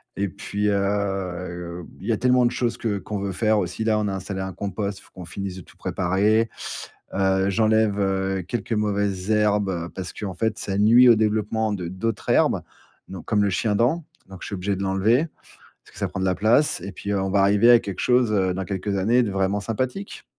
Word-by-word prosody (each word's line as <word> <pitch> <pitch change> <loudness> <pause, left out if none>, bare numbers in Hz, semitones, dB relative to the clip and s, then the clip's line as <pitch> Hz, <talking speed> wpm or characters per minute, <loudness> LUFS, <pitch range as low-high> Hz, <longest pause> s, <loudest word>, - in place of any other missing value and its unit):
et 100 +1 -1
puis, 100 +2 -3
heu, 90 -4 -2 0.2
il 100 - -8
y - - +2
a 110 - +1
tellement 125 +1 +3
de 120 - +2
choses 120 -2 -1
que 105 -3 -1
qu'on 100 +1 -5
veut 100 0 -3
faire 110 +3 +2
aussi. 90 +4 -3
Là, 110 -1 +2
on 105 - 0
a - - -3
installé 95 0 -4
un 95 0 -4
compost, 100 +1 -4
faut - - -21
qu'on 90 - -9
finisse 95 +2 -6
de - - -8
tout - - -19
préparer, 105 +5 +1 0.6
heu, 95 0 +2
j'enlève, 110 0 +2
heu, 95 -1 0
quelques 115 0 -3
mauvaises 100 -2 -1
herbes, 105 -5 +1
parce 90 -2 -5
qu'en 100 -3 -5
fait, 110 +3 -1
ça 95 -1 -3
nuit 115 +5 +6
au 115 - +8
développement 110 0 0
de 90 -4 -4
d'autres 110 +5 -3
herbes, - - +3 0.5
donc 95 -3 -8
comme 105 -2 +2
le 100 - +2
chiendent, 115 - +1 0.3
donc 95 -2 -11
je - - -6
suis 100 - -4
obligé 100 +2 -1
de 100 - -3
l'enlever. 105 - +2 0.6
Parce - - -20
que - - -14
ça - - -1
prend 95 - -5
de - - 0
la 95 -1 +1
place 115 +8 +3
et 95 +3 -7
puis 100 - -5
on 95 -1 0
va 100 +1 +3
arriver 100 +4 +5
à 120 - +8
quelque 100 -4 -6
chose, 125 -3 +3
heu, 95 -3 +1
dans 95 +1 -3
quelques 100 +2 -3
années 115 +6 +3
de 105 - -2
vraiment 95 +1 0
sympathique. 130 - -4
100 Hz, 220 wpm, -23 LUFS, 95-110 Hz, 0.6 s, au